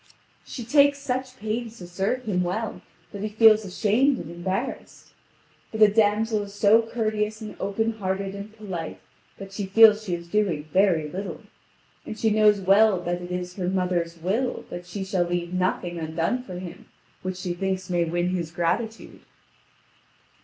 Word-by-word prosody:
She 245 - -7
takes 285 +3 +4
such 260 -2 -4
pains 225 +1 -4
to 180 - -9
serve 195 +8 -2
him 200 -6 0
well 200 +6 -3 0.3
that 200 - -7
he 215 - -2
feels 220 0 +6
ashamed 220 +8 +2
and 165 - -7
embarrassed. 180 +3 -5 0.6
But 220 - -6
the 215 - +9
damsel 215 +1 +2
is 200 0 -8
so 210 +2 +5
courteous 215 -2 -2
and 215 -2 -8
open 220 +3 -1
hearted 195 0 -2
and 200 +1 -8
polite 190 -7 -6 0.4
that 195 0 -9
she 195 0 -4
feels 215 +1 +7
she 180 -4 -1
is 170 0 -9
doing 180 -6 0
very 185 -5 +3
little. 190 +6 -6 0.6
And 215 - -7
she 220 -1 +1
knows 210 -1 +4
well 195 +1 +5
that 175 0 -2
it 175 - -7
is 180 +1 -4
her 180 -2 -1
mother's 180 -3 -1
will 205 +10 -1
that 175 0 -7
she 195 +1 -5
shall 190 -2 0
leave 175 0 -3
nothing 180 -1 -1
undone 165 +9 -1
for 185 -8 -8
him 180 0 -9 0.3
which 185 0 -4
she 180 -1 -3
thinks 190 +1 -2
may 175 -1 +1
win 175 +2 -1
his 175 -3 -2
gratitude. 195 +7 -2
195 Hz, 170 wpm, -25 LUFS, 180-220 Hz, 0.6 s, the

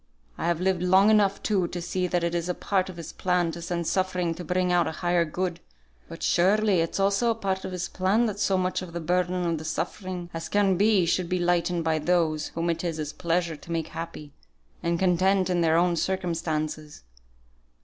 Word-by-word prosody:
I - - -3
have 170 -1 +1
lived 185 -1 +1
long 190 +3 +5
enough, 200 -2 +3
too, 195 -5 +1
to 175 - -5
see 180 +1 -2
that 175 -1 0
it 170 0 0
is 175 +1 -1
part 190 -2 0
of 180 - -9
His 170 - -8
plan 180 -2 0
to 170 - -8
send 170 0 -3
suffering 185 -1 0
to 175 +2 -8
bring 180 +2 0
out 175 -1 +3
a - - -2
higher 175 +1 +1
good; 175 +2 -3 0.5
but - - -8
surely 200 +2 +3
it's 165 +3 -1
also 200 +4 +2
part 190 -3 -2
of 190 - -5
His 180 -1 -3
plan 195 +7 +1
that 210 -3 -2
as 205 - +1
much 185 -1 0
of 180 -2 -8
the 170 - -3
burden 180 +1 0
of 165 -2 0
the - - -7
suffering 175 +3 -4
as 165 0 -5
can 200 -2 +3
be, 200 -1 +3
should 170 +1 0
be 185 - +1
lightened 175 -1 +1
by 160 -1 +1
those 155 -1 +1
whom 170 +1 -1
it 165 +1 -4
is 165 -2 -2
His 155 -1 -4
pleasure 170 -1 -1
to 170 - -11
make 165 -1 -2
happy, 165 -3 -7 0.5
and 170 0 0
content 185 +1 +2
in 175 -1 +1
their 165 -1 +3
own 175 0 +3
circumstances. 160 - -2
175 Hz, 210 wpm, -26 LUFS, 170-185 Hz, 0.5 s, long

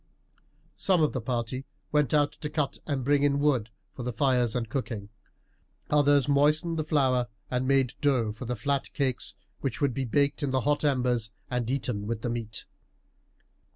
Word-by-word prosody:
Some 180 -4 +3
of 150 - +2
the 130 - -2
party 120 +2 -2 0.3
went 150 -4 +2
out 145 -1 +3
to 150 - -6
cut 150 -2 -1
and 140 -4 -1
bring 145 0 +3
in 140 -1 +3
wood 140 -6 +2 0.2
for - - -7
the 125 0 -2
fires 125 -1 +2
and 120 -2 -1
cooking; 110 -5 -4 0.8
others 145 -2 +4
moistened 150 +3 +3
the - - +1
flour 130 -5 +2 0.2
and 125 +1 0
made 135 -2 +3
dough 130 -7 +2
for 110 +4 -8
the 125 +1 -2
flat 140 +5 -1
cakes 130 -3 -1 0.2
which 135 -4 -3
would 140 -4 +1
be 135 +2 -2
baked 140 +6 +1
in 145 - 0
the 130 0 +1
hot 145 +3 +1
embers 125 -5 +1 0.2
and 125 -2 -1
eaten 125 -6 -2
with 115 -1 -3
the 120 - -1
meat. 115 -2 -4
130 Hz, 180 wpm, -28 LUFS, 120-145 Hz, 0.8 s, others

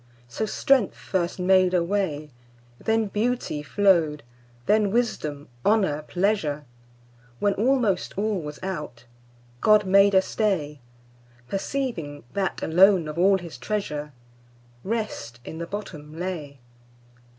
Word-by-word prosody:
So 215 - -3
strength 260 -1 +2
first 175 -3 -2
made 185 0 +4
a 175 - +3
way, 170 -6 -2 0.5
Then 225 0 +1
beauty 215 -6 -1
flow'd, 165 -3 +2 0.4
then 210 -1 +3
wisdom, 155 -11 -1 0.2
honour, 195 -9 +2
pleasure; 175 -7 0 0.7
When 205 +5 +1
almost 225 -5 +1
all 205 -2 0
was 150 -1 -7
out, 150 -10 -5 0.5
God 215 - +5
made 195 +1 +5
a 190 - +7
stay, 165 -10 -1 0.7
Perceiving 195 - -3
that, 195 -1 -2
alone 180 0 +5
of 155 +2 -5
all 195 +2 +5
His 170 -8 -9
treasure, 150 -3 -3 0.7
Rest 195 - -4
in 160 - -7
the 170 - -4
bottom 160 -6 -7
lay. 165 -6 -5
185 Hz, 115 wpm, -25 LUFS, 150-205 Hz, 0.7 s, a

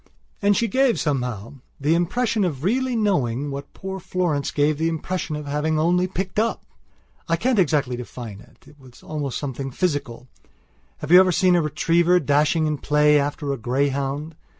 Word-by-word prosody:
And 205 0 +3
she 230 - +1
gave, 260 +3 +2
somehow, 125 -7 -2 0.3
the 145 +3 +2
impression 210 +6 0
of 150 -7 -2
really 250 +6 0
knowing 145 - 0
what 140 0 -7
poor 190 0 -6
Florence 170 -6 -1
gave 145 +1 +1
the 160 - +1
impression 165 0 -3
of 150 0 -6
having 150 +2 -1
only 175 +3 +2
picked 190 +2 -3
up. 230 +1 -1 0.6
I 165 - +3
can't 240 +5 +1
exactly 145 -7 +1
define 120 -4 -8
it. - - -22
It 145 - -18
was 130 -2 -17
almost 145 -4 -4
something 135 -1 -4
physical. 135 -6 -3 0.7
Have 150 - -4
you 180 - +10
ever 185 -1 +5
seen 180 +1 +3
a 175 - +3
retriever 170 +3 +2
dashing 150 +2 +2
in 150 -2 -1
play 150 +1 +3
after 145 0 -2
a - - -4
greyhound? 140 +5 -1
150 Hz, 175 wpm, -23 LUFS, 140-180 Hz, 0.7 s, you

